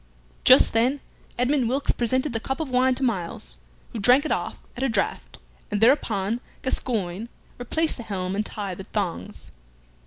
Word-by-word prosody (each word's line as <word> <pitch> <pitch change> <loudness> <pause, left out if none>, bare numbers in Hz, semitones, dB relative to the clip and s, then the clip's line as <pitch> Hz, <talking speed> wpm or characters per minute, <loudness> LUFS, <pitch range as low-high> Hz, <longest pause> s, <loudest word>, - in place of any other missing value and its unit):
Just - - +7
then 250 +5 +2 0.4
Edmund 250 0 +2
Wilkes 275 +3 +1
presented 255 +3 0
the 225 - -1
cup 265 +6 -4
of 310 -5 -4
wine 255 +1 +3
to 270 - -3
Myles, 170 - -3 0.3
who 230 - -5
drank 250 +7 +5
it - - -2
off - - -2 0.2
at 245 - -6
a 270 - +1
draught, 210 -4 -2 0.3
and 205 - -1
thereupon 225 -3 +2 0.2
Gascoyne 220 -5 -2 0.3
replaced 315 +7 -1
the - - -6
helm 185 -3 -3
and 210 - 0
tied 200 -4 -5
the 190 - -7
thongs. 185 - -4
235 Hz, 165 wpm, -24 LUFS, 200-260 Hz, 0.4 s, Just